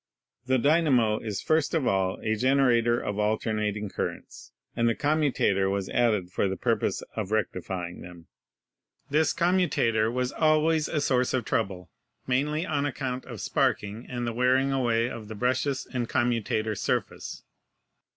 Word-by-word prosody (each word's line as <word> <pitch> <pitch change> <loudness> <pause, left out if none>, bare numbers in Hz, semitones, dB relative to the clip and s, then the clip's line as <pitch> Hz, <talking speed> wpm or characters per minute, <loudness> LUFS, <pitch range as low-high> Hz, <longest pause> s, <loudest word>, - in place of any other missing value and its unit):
The 130 0 +3
dynamo 130 -6 +3
is 105 -3 -4
first 160 +1 +1
of 155 -5 +1
all 95 -3 +1
a 110 0 +1
generator 120 -1 +3
of 105 0 -4
alternating 105 -1 -1
currents, - - -6 0.2
and 115 0 +2
the 115 - 0
commutator 145 -10 +1
was 100 -1 -2
added 105 -7 +1
for 100 - 0
the 95 0 -3
purpose - - 0
of 105 -3 -3
rectifying 90 -4 -3
them. 85 -1 -11 0.9
This 155 +2 +3
commutator 165 -11 +2
was 125 +1 -1
always 155 0 +2
a 155 - -1
source 130 -2 +1
of 125 -4 -1
trouble, 95 -6 -2 0.3
mainly 150 +6 0
on 145 -4 0
account 130 -2 -4
of 120 -6 -8
sparking 105 +3 -1
and 120 -1 -3
the 120 - -2
wearing 130 +3 +2
away 120 -3 +1
of 115 -3 -7
the 110 - -7
brushes 130 +4 0
and 120 -2 -2
commutator 115 -2 0
surface. 100 - -3
120 Hz, 150 wpm, -27 LUFS, 105-135 Hz, 0.9 s, The